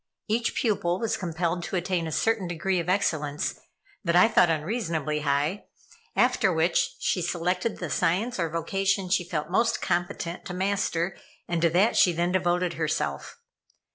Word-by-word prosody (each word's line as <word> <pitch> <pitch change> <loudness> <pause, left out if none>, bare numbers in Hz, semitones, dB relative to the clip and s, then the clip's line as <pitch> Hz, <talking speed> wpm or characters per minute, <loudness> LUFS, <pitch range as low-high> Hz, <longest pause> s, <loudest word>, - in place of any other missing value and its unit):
Each 230 +2 0
pupil 195 -6 0
was 230 - 0
compelled 170 -1 -2
to - - -4
attain 175 -1 -1
a - - -4
certain 225 +3 +1
degree 175 +2 -1
of 170 +1 -3
excellence 150 -6 0 0.4
that 170 -2 +1
I 180 - +7
thought 200 -6 +4
unreasonably 160 - -1
high, 145 +6 0 0.5
after - - +3
which - - +1
she 185 - 0
selected 180 +5 -1
the 175 -5 -5
science 200 +10 0
or 165 -2 0
vocation 195 +4 -1
she 180 0 +2
felt 155 -1 -3
most 230 +4 +2
competent 175 -1 -2
to 180 - -5
master, 190 -2 0 0.3
and 170 -1 -1
to 170 - +4
that 185 +7 +3
she 180 - +5
then 175 +2 0
devoted 180 -1 +1
herself. 150 - -2
175 Hz, 160 wpm, -26 LUFS, 165-195 Hz, 0.5 s, I